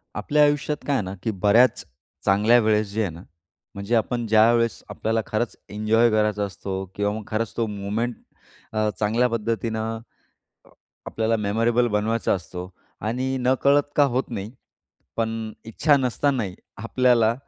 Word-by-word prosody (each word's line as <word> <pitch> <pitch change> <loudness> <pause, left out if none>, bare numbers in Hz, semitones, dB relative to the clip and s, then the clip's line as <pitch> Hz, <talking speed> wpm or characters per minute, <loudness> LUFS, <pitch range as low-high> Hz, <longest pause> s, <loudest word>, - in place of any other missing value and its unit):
आपल्या 150 0 +2
आयुष्यात 145 0 +1
काय 140 - +2
आहे 120 - 0
ना, 95 +1 -5
की 110 - 0
बऱ्याच 105 +5 +3 0.4
चांगल्या 105 +5 +5
वेळेस 110 -1 +2
जे 110 +2 -1
आहे 100 - 0
ना, 85 - -11 0.5
म्हणजे 100 +4 -1
आपण 120 +2 0
ज्यावेळेस 115 +2 +3
आपल्याला 110 0 -1
खरंच 110 +2 -2
एन्जॉय 110 +3 +2
करायचा 105 -1 +1
असतो 95 0 -5
किंवा 105 0 0
मग 110 0 -5
खरंच 110 +1 -2
तो 115 - +1
मोमेंट 105 +4 -2 0.6
अ, 110 0 +1
चांगल्या 115 +4 +2
पद्धतीनं 115 0 -2 0.7
अ, - - -21 0.4
आपल्याला 115 0 0
मेमोरेबल 115 +3 +1
बनवायचा 110 +2 0
असतो 90 0 -7 0.3
आणि 130 +5 -2
नकळत 135 +3 +3
का 145 - +6
होत 130 +2 +1
नाही. 105 -1 -5 0.6
पण 110 -1 -2
इच्छा 145 +7 +2
नसतानाही 125 -5 0 0.2
आपल्याला 115 0 +3
110 Hz, 145 wpm, -24 LUFS, 105-120 Hz, 0.7 s, का